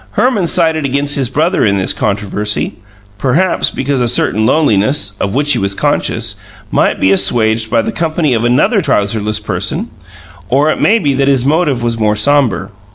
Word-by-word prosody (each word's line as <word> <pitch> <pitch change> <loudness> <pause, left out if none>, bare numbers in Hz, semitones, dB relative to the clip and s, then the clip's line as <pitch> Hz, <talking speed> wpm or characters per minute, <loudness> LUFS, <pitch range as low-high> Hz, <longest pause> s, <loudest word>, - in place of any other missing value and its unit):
Herman 215 -5 +1
sided 160 -2 +1
against 140 +2 +1
his 135 -4 0
brother 160 +7 0
in 100 -2 +2
this 95 - 0
controversy, 105 +1 -2 0.5
perhaps 165 +8 +1
because 135 -1 -2
a 120 - +1
certain 110 -1 +1
loneliness, 110 -6 +1
of 100 +3 -2
which 145 +1 +1
he 120 - 0
was 100 0 -1
censcious, - - -1 0.3
might - - +1
be 95 - +2
assuaged 110 +3 +1
by 115 -1 +1
the - - -3
company 160 -3 -1
of 115 -1 -1
another 135 - +2
trouserless 105 - 0
person 105 - -4 0.6
or 145 +6 +2
it - - -3
may 225 - +4
be 145 -10 0
that 135 +1 0
his 135 -3 +2
motive 145 -4 +1
was 115 -1 -1
more 105 -1 +1
sombre. 115 -4 +1
130 Hz, 175 wpm, -13 LUFS, 105-150 Hz, 0.6 s, may